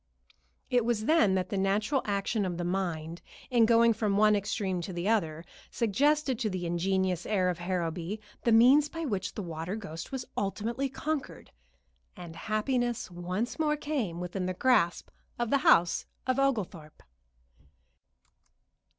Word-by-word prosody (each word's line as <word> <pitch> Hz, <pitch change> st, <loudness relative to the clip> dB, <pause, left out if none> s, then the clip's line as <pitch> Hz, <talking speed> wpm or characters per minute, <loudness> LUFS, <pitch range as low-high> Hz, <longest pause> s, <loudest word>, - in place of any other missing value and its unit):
It 245 Hz, -2 st, +3 dB
was 225 Hz, -2 st, 0 dB
then 225 Hz, -12 st, +4 dB
that 185 Hz, -1 st, -1 dB
the 200 Hz, -, -1 dB
natural 210 Hz, +8 st, +1 dB
action 205 Hz, +1 st, -1 dB
of 180 Hz, -3 st, -3 dB
the 175 Hz, -, -3 dB
mind, 170 Hz, -3 st, -3 dB, 0.3 s
in 235 Hz, -3 st, +5 dB
going 230 Hz, 0 st, +5 dB
from 210 Hz, -2 st, 0 dB
one 210 Hz, 0 st, +5 dB
extreme 195 Hz, -2 st, -2 dB
to 170 Hz, -, -6 dB
the 175 Hz, +2 st, -3 dB
other, 165 Hz, -7 st, 0 dB, 0.2 s
suggested 265 Hz, +3 st, +1 dB
to 220 Hz, -, 0 dB
the 185 Hz, -2 st, -4 dB
ingenious 185 Hz, +1 st, 0 dB
heir 185 Hz, -4 st, +2 dB
of 180 Hz, -1 st, -3 dB
Harrowby 175 Hz, +2 st, -3 dB, 0.2 s
the 235 Hz, -, +2 dB
means 260 Hz, +6 st, +6 dB
by 330 Hz, +1 st, -5 dB
which 200 Hz, -7 st, -3 dB
the 210 Hz, -, -4 dB
water 165 Hz, +2 st, -4 dB
ghost 165 Hz, -7 st, -7 dB
was 265 Hz, -2 st, -4 dB
ultimately 230 Hz, +7 st, -2 dB
conquered, 290 Hz, +2 st, -4 dB, 0.7 s
and 170 Hz, -2 st, -9 dB
happiness 240 Hz, +1 st, -1 dB
once 180 Hz, -, -3 dB
more 300 Hz, -1 st, +1 dB
came 260 Hz, -, -3 dB
within 180 Hz, +1 st, -3 dB
the 185 Hz, -, -3 dB
grasp 215 Hz, -7 st, +2 dB, 0.3 s
of 240 Hz, -1 st, -2 dB
the 280 Hz, -, +4 dB
house 175 Hz, -8 st, +4 dB, 0.2 s
of 255 Hz, +1 st, +1 dB
Oglethorpe. 205 Hz, -, -2 dB
205 Hz, 150 wpm, -29 LUFS, 180-240 Hz, 0.7 s, means